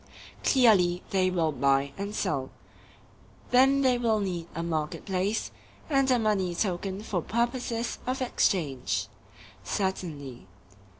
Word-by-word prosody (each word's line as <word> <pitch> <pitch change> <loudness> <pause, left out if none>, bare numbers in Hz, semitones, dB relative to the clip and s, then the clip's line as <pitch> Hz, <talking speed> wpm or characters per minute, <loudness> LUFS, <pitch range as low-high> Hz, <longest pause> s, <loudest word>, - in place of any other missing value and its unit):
Clearly 195 -9 +4
they 185 -1 +2
will 170 -4 +1
buy 140 0 +1
and 200 +1 -5
sell. 135 -8 -1 1.0
Then 270 +2 +5
they 250 -2 +3
will 225 -3 +2
need 180 -4 -3
a 165 - -2
market 155 -3 -3
place, 195 +3 -1 0.4
and 275 -1 +3
a 255 - +4
money 200 -6 0
token 190 +1 -2
for 185 -5 -2
purposes 235 +2 -2
of 255 +1 -1
exchange. 165 - 0 0.6
Certainly. 150 - -3
190 Hz, 120 wpm, -28 LUFS, 165-235 Hz, 1.0 s, Then